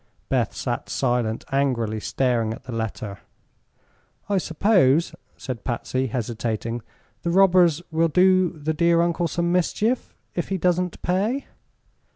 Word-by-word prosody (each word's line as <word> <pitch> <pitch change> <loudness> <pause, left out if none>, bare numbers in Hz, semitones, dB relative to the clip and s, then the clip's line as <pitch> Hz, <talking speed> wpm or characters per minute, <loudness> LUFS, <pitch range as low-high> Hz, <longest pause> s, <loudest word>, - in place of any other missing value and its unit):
Beth - - 0
sat - - -3
silent, 120 -4 0
angrily 120 -6 0
staring 115 -2 0
at - - -16
the 130 - -8
letter. 110 -3 -4 1.1
"I 200 -2 +2
suppose," 165 -4 +3 0.2
said 125 -6 -6
Patsy, 130 +2 -2
hesitating, 115 0 -3 0.4
"the 170 - -2
robbers 175 -3 +4
will 165 +1 +3
do 185 +2 +4
the 160 -1 -3
dear 170 +1 +3
uncle 170 0 0
some 170 +1 -1
mischief, 210 +7 0 0.2
if 175 - -2
he 195 - 0
doesn't 180 0 0
pay." 205 +10 0
160 Hz, 130 wpm, -24 LUFS, 120-180 Hz, 1.1 s, robbers